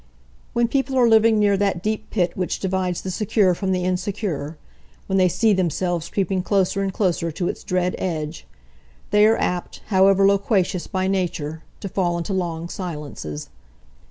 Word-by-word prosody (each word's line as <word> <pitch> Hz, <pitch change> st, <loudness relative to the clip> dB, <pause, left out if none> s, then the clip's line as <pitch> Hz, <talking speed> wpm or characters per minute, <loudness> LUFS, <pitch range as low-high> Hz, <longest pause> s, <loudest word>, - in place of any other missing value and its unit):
When 235 Hz, 0 st, +2 dB
people 270 Hz, +1 st, 0 dB
are 245 Hz, -2 st, +5 dB
living 225 Hz, 0 st, +5 dB
near 205 Hz, -1 st, +3 dB
that 195 Hz, -3 st, 0 dB
deep 215 Hz, 0 st, -2 dB
pit 180 Hz, -5 st, +1 dB
which 180 Hz, -1 st, -2 dB
divides 185 Hz, -2 st, -1 dB
the 190 Hz, -, -3 dB
secure 195 Hz, -1 st, +2 dB
from 190 Hz, +2 st, -2 dB
the 180 Hz, -1 st, 0 dB
insecure—when 185 Hz, -1 st, -4 dB
they 185 Hz, -1 st, +4 dB
see 220 Hz, +5 st, +3 dB
themselves 175 Hz, -2 st, -1 dB
creeping 190 Hz, -1 st, 0 dB
closer 195 Hz, 0 st, +1 dB
and 195 Hz, -1 st, -1 dB
closer 175 Hz, -4 st, 0 dB
to 175 Hz, +3 st, -2 dB
its -, -, -4 dB
dread 180 Hz, 0 st, 0 dB
edge—they 150 Hz, -, -2 dB
are 225 Hz, -, +3 dB
apt, 180 Hz, -1 st, -2 dB
however 195 Hz, 0 st, +5 dB
loquacious 195 Hz, -2 st, +1 dB
by 190 Hz, -2 st, -1 dB
nature, 170 Hz, -5 st, -2 dB, 0.2 s
to -, -, -4 dB
fall 180 Hz, -3 st, 0 dB
into 170 Hz, +3 st, -3 dB
long 170 Hz, -3 st, -2 dB
silences. 150 Hz, -, -6 dB
185 Hz, 155 wpm, -22 LUFS, 170-200 Hz, 0.2 s, are